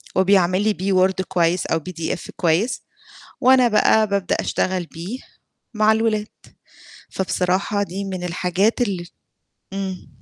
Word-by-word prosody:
وبيعمل 190 -1 +3
لي 215 -1 +2
بيه 190 +1 -1
Word 190 0 -3
كويس 175 -1 +1
أو 165 - +1
PDF 165 0 -5
كويس، 175 +8 +1 0.6
وأنا 255 -1 +5
بقى 215 0 +4
بابدأ 200 -2 0
أشتغل 185 -2 -1
بيه 180 +12 -7 0.6
مع 215 0 +4
الولاد، 220 -1 0 0.8
فبصراحة 190 +2 0
دي 200 +1 -4
من 185 -2 -5
الحاجات 180 +6 0
ال 185 -6 -2 0.7
امم. 190 -2 -5
190 Hz, 125 wpm, -21 LUFS, 180-210 Hz, 0.8 s, وأنا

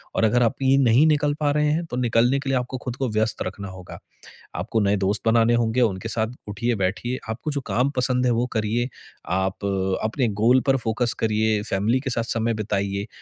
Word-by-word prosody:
और - - +1
अगर 120 +3 +3
आप 115 - +1
ये 135 0 +4
नहीं 130 +2 +5
निकल 150 -1 +2
पा 145 -1 +1
रहे 150 +1 +2
हैं, 165 +3 -1
तो 125 - -6
निकलने 120 +2 +2
के 135 -1 -5
लिए 135 - +2
आपको 125 +1 -5
खुद 125 -2 -4
को 135 - -1
व्यस्त 110 0 -1
रखना 100 +1 -6
होगा। 95 -1 -10 0.6
आपको 105 +6 -1
नए 100 0 +2
दोस्त 100 +1 0
बनाने 115 +1 +4
होंगे, 120 +1 +1
उनके 105 -1 0
साथ 110 -1 0 0.2
उठिए-बैठिए। 110 +2 -1
आपको 115 +7 -4
जो 140 - -2
काम 125 +3 +1
पसंद 125 0 +1
है, 125 - +3
वो 120 +1 +1
करिए। 115 +2 0 0.4
आप, 95 +3 -1 0.4
अपने 115 +3 0
गोल 125 +4 +5
पर 135 - +5
फ़ोकस 120 -1 -1
करिए, 110 -1 +1
फ़ैमिली 110 +5 0
के 130 -1 -4
साथ 115 -1 0
समय 115 0 0
बिताइए। 100 -2 -2
115 Hz, 205 wpm, -23 LUFS, 105-125 Hz, 0.6 s, नहीं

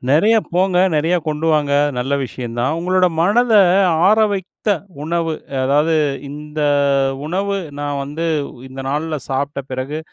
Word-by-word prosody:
நெறைய 205 +11 +4 0.2
போங்க, 185 +1 +1 0.2
நெறையா 165 +4 +2
கொண்டு 155 +1 -2
வாங்க! 145 -2 +1 0.3
நல்ல 135 +3 -2
விஷயம் 120 -2 -6
தான். 135 +6 0
உங்களோட 185 +1 +2
மனத 225 +7 +3 0.5
ஆற 215 +2 +5
வைத்த 195 +2 -5 0.3
உணவு, 165 +1 -1 0.3
அதாவது 150 +4 +2 0.3
இந்த 150 +1 -7 0.7
உணவு 195 +4 -1 0.2
நான் 145 -1 -2
வந்து 155 +4 -5 0.4
இந்த 135 +1 -8
நாள்ல 155 +2 -2
சாப்ட்ட 140 +1 -2
பிறகு 130 +4 -4
155 Hz, 130 wpm, -18 LUFS, 140-180 Hz, 0.7 s, ஆற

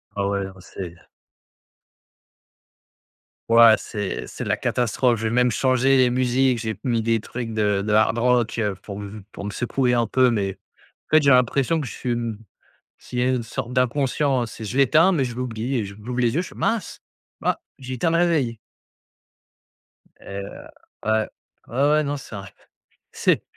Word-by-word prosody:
Ah, 100 -1 0
ouais, 100 -1 -1
non, 95 - -9
c'est 90 -1 -8 2.5
Ouais 115 -1 +8
c'est 105 -3 -4
c'est - - -6
la - - 0
catastrophe. 120 0 +1
Je 110 - -6
vais 110 - +1
même 125 0 +4
changer 130 +3 +3
les 125 -1 +4
musiques, 125 0 +2
j'ai 110 -3 -4
mis 120 -3 +1
des 115 0 +1
trucs 115 +2 -6
de 105 -2 +1
de 105 - -2
hard 110 +1 +4
rock 120 -1 +2 0.2
pour 100 0 -7
m 100 0 -8
pour - - -8
me 105 - -3
secouer 125 +3 0
un 120 -1 +2
peu, 130 +3 +3
mais 100 -4 -1 0.5
en - - +7
fait, 155 - +5
j'ai 140 - +2
l'impression 130 +5 +3
que 145 - -3
je - - -7
suis, 125 - -4
hem 115 -2 -3 0.6
s'il 125 - -8
y - - +2
a 130 - +2
une 130 -2 +1
sorte 120 +2 -5
d'inconscience, 125 -2 0
je 110 +4 -4
l'éteins, 155 +7 +5
mais 145 -7 +1
je 120 - -5
l'oublie, 125 +1 -3
et 110 - -1
j'ou 100 - -9
j'ouvre 125 0 -3
les 120 +1 +2
yeux, 175 - +1
je - - -9
fais: - - -15
«Mince, 225 -5 -2 0.4
bah, - - 0 0.2
j'ai 130 0 -5
éteint 165 +7 +1
le 165 - +2
réveil». 150 -10 +1 1.6
Et - - -16
heu, 100 0 -5 0.6
ouais. 110 0 +2 0.4
Ouais, 130 +4 -2
ouais, 150 0 +3
non 145 0 -2
c'est 125 -5 -10
un 100 - -7 0.7
c'est - - +1
120 Hz, 185 wpm, -23 LUFS, 110-130 Hz, 2.5 s, Ouais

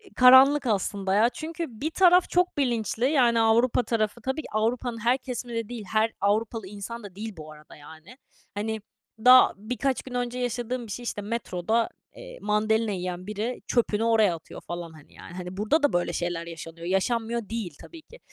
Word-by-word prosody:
karanlık 260 +2 +7
aslında 200 -2 -1
ya 220 +4 +4
çünkü 325 +5 -5 0.2
bir 310 +3 -1
taraf 360 0 +5
çok 360 -2 +1
bilinçli. 240 -3 0
Yani, 240 -5 +3
Avrupa 230 +2 +3
tarafı 220 0 -1
tabii 265 +6 -2
ki - - -10
Avrupa'nın 230 +2 -1
her 245 +2 +3
kesimi 250 -2 -6
de 230 -1 -3
değil, 235 -4 -7
her 220 +1 +2
Avrupalı 215 +1 0
insan 210 +4 -7
da 195 -3 -11
değil 220 +2 -6
bu 155 0 -9
arada, 150 0 -15
yani. 160 - -14 0.4
Hani, 220 +1 -3 0.4
daha 255 +1 +8
birkaç 250 +5 -2
gün 260 - -10
önce 245 0 -2
yaşadığım 245 0 -3
bir - - -8
şey 245 - -5
işte, 220 -3 -4
metroda, 220 0 -1 0.3
eee, - - -11
mandalina 215 +1 +1
yiyen 180 -1 -4
biri 215 +4 -4
çöpünü 225 -3 +1
oraya 220 -6 +3
atıyor 165 - -11
falan, 175 -1 -6
hani, 155 -2 -17
yani. - - -12
Hani, 180 0 -7
burada 255 +10 +1
da 290 - +3
böyle 175 0 0
şeyler 175 -1 -3
yaşanıyor, 165 0 -9
yaşanmıyor 225 +3 -1
değil 220 -9 -4
tabii 330 -1 -12
ki. 480 +10 -17
225 Hz, 185 wpm, -26 LUFS, 200-250 Hz, 0.4 s, daha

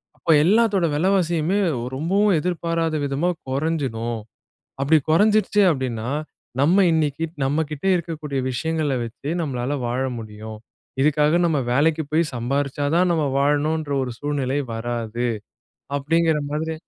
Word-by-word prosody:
அப்போ 165 - 0
எல்லாத்தோட 205 -1 +3
விலைவாசியுமே 175 +1 +1 0.2
ஒ - - -4
ரொம்பவும் 190 +7 +2
எதிர்பாராத 165 -1 -1
விதமா, 140 +5 0 0.2
குறைஞ்சிடும். 130 -5 -2 0.6
அப்டி 150 +4 +4
குறைஞ்சிருச்சு 210 +4 +4
அப்டின்னா, 125 -5 -3 0.5
நம்ம 180 +7 +5
இன்னைக்கு 160 -1 0 0.2
நம்ம 145 +4 +1
கிட்ட 150 +3 -6
இருக்கக்கூடிய 155 -5 -3
விஷயங்கள 155 +1 -1
வச்சு, 120 +5 -7
நம்மளால 135 -2 -2
வாழ 120 +2 -1 0.2
முடியும். 110 0 -8 0.4
இதுக்காக 150 +2 +3
நம்ம 160 -4 +1
வேலைக்கு 155 +5 +2
போய் 160 +2 +3
சம்பாரிச்சா 140 +4 -1
தான், 180 +1 +3
நம்ம 160 -2 +1
வாழணுன்ற 145 +2 +1
ஒரு 125 - -4
சூழ்நிலை 145 -2 -1
வராது. 120 0 -3 0.7
அப்படிங்கிற 160 +2 +2
மாதிரி 160 +2 -2
150 Hz, 120 wpm, -22 LUFS, 135-165 Hz, 0.7 s, நம்ம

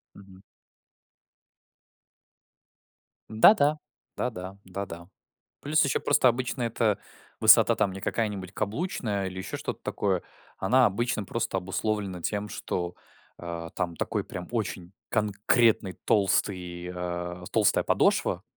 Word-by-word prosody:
Мгм. 95 -1 -15 2.9
Да-да, 145 - +5 0.4
да-да, 95 -5 -4
да-да, 90 -2 -7 0.5
плюс 155 +2 +2
еще 140 - 0
просто - - +3
обычно 125 +1 -1
эта 115 -2 +1 0.4
высота - - +7
там 95 - +1
не 95 - -7
какая-нибудь 100 -4 -2
каблучная 105 - -2
или 95 - -8
еще 95 - -5
что-то - - -5
такое. 95 -3 -1 0.3
Она 125 +7 +4
обычно 110 +1 -1
просто 105 -1 -2
обусловлена 95 0 -2
тем, 105 +4 -2
что, 90 -3 -4 0.4
а, 85 -1 -6
там 90 -2 -3
такой - - -2
прям 90 - -7
очень 100 -6 -3 0.2
конкретный 105 -1 +2
толстый, 90 -3 0
а, 90 0 -4
толстая 110 -3 +3
подошва, 90 - +2
100 Hz, 110 wpm, -27 LUFS, 90-110 Hz, 2.9 s, высота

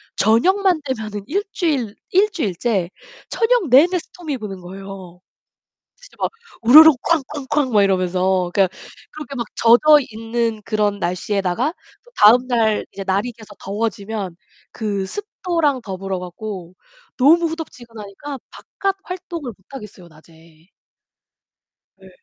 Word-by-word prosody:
저녁만 360 - +3
되면 220 -5 -4 0.2
1 395 +9 -1
주일 270 - -1 0.2
1 400 +3 +4
주일째 200 - -1 0.4
저녁 460 -4 +1
내내 335 +9 +5
스톰이 320 -3 -6
부는 200 -5 -7
거예요. 190 -1 -10 0.8
진짜 - - -18
막 - - +1 0.3
우르르 305 +8 +9
쾅 330 -3 +2
쾅 290 -2 -7
쾅 285 -4 +1
막 210 - +5
이러면서 185 -1 +1
그러니까 190 -2 +1 0.3
그렇게 300 -2 -8
막 235 -3 -3
젖어 295 +6 +6
있는 225 0 -2
그런 210 -1 0
날씨에다가 185 - -1 0.3
또 485 - -22
다음 245 +4 +6
날 225 -4 +1
이제 195 - -7
날이 200 +6 0
계속 215 -2 -15
더워지면 200 -2 -4 0.4
그 205 -3 -3
습도랑 335 - -2
더불어 190 -2 -4
갖고 180 0 -8 0.4
너무 330 +6 +5
후덥지근하니까 245 -5 -8
바깥 390 -1 -3
활동을 350 -7 -6
못 190 - -32
하겠어요, 210 -9 -10
낮에. 160 +1 -21 1.3
예. - - -15
225 Hz, 270 characters per minute, -20 LUFS, 195-300 Hz, 1.3 s, 우르르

